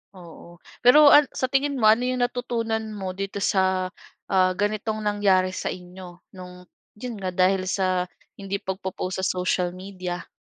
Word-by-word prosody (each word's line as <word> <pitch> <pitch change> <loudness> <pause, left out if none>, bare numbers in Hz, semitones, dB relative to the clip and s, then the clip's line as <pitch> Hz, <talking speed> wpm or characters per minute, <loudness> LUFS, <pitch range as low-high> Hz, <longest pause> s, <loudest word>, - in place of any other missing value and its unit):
Oo, 170 -1 -13 0.2
pero 285 +4 +7
an 295 -1 +7
sa 260 0 -2
tingin 280 +1 +1
mo, 250 - -3
ano 240 +3 +4
'yong 255 -1 0
natutunan 235 -3 -2
mo 190 -2 -4
dito 195 +1 -5
sa, 190 -1 +1 0.4
ah, 185 -1 +4
ganitong 215 +1 -2
nangyari 200 -3 +2
sa - - -5
inyo, 180 0 -9
no'ng 180 -1 -11 0.3
'yon 235 +2 -6
nga, 185 -1 -3
dahil 185 +1 +2
sa 185 -1 0 0.3
hindi 195 0 -4
pagpo-post 190 -1 -4
sa 190 - -1
social 180 -1 -1
media? 185 -1 -6
190 Hz, 155 wpm, -24 LUFS, 185-220 Hz, 0.4 s, pero